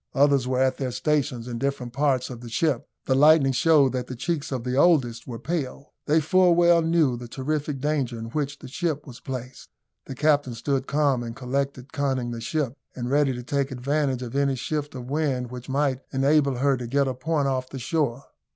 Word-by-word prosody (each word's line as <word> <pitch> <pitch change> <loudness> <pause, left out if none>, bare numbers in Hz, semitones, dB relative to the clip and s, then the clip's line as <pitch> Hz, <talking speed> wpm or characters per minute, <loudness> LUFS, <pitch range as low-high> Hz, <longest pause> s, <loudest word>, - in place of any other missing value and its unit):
Others 140 -2 +3
were 130 0 0
at 130 0 +1
their 130 -2 -1
stations 135 -3 -1
in 120 -1 -4
different 135 -3 -2
parts 135 -2 +1
of 120 -1 -8
the 120 - -8
ship. 135 +1 0 0.2
The 130 - +2
lightning 145 0 +6
showed 145 -1 +4
that 125 -1 -3
the 130 - -6
cheeks 145 +4 -3
of 130 -3 -3
the 125 0 -2
oldest 130 -7 +3
were 120 -2 -5
pale. 145 -2 -4
They 155 +2 +4
full 175 +3 +4
well 170 0 +5
knew 160 -5 +2
the 120 0 -8
terrific 145 +3 -3
danger 135 -4 -1
in 115 0 -7
which 145 -1 -2
the - - -11
ship 150 +2 -2
was 125 -5 -11
placed. 130 -2 -7 0.4
The 135 - -6
captain 145 -3 +2
stood 135 +3 -1
calm 140 -4 +2
and 115 -1 -6
collected, 135 +1 -3
conning 130 -4 -1
the 115 -1 -5
ship, 140 0 -1 0.2
and 125 0 -4
ready 145 -1 +3
to 125 -1 -5
take 140 +1 -1
advantage 135 0 -1
of 120 +1 -7
any 140 -1 +2
shift 145 +2 -3
of 125 -1 -7
wind 135 -4 -1
which 125 +1 -8
might 135 -1 0
enable 140 0 +3
her 135 +1 +2
to 120 -1 -5
get 140 +3 +1
a 130 - -1
point 145 +2 -1
off 130 -1 -1
the 135 - -7
shore. 140 -1 -1
135 Hz, 210 wpm, -25 LUFS, 125-150 Hz, 0.4 s, lightning